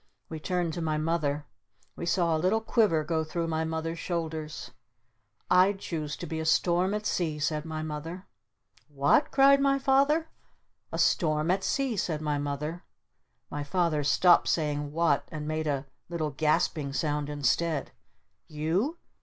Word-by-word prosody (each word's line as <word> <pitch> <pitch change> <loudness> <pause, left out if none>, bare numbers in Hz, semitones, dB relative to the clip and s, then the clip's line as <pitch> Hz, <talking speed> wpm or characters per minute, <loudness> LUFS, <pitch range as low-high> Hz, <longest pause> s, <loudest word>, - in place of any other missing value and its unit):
We 160 - -5
turned 175 0 -1
to 170 - -4
my 155 -1 0
Mother. 150 -2 -1 0.5
We 170 - -5
saw 170 -2 +2
a - - 0
little 185 +7 +2
quiver 215 -8 +2
go 160 +1 0
through 165 +2 -3
my 160 0 -1
Mother's 160 +1 -3
shoulders. 160 -3 -4 0.8
"I'd 185 +2 +4
choose 155 -6 -4
to - - -6
be 160 -1 -4
a - - -2
Storm 175 +4 +2
at 210 0 -4
Sea!" 160 -7 -1
said 150 +1 -1
my 155 -1 -4
Mother. 160 +4 -6 0.6
"What?" 145 - +2
cried 275 0 +5
my 275 0 +3
Father. 280 +4 +2 0.6
"A - - -3
Storm 155 0 +2
at 195 +1 0
Sea!" 270 -4 0
said 160 -4 -1
my 150 -1 -1
Mother. 150 +4 -4 0.7
My 145 0 -3
Father 165 -1 0
stopped 175 +5 +5
saying 150 -2 0
"What?" 165 -2 +1
And 150 -1 -5
made 155 0 -2
a 140 -2 -1 0.2
little 160 -3 -2
gasping 150 -1 0
sound 150 -1 -1
instead. 145 +2 0 0.6
"_You? 165 - -1
160 Hz, 155 wpm, -28 LUFS, 150-180 Hz, 0.8 s, cried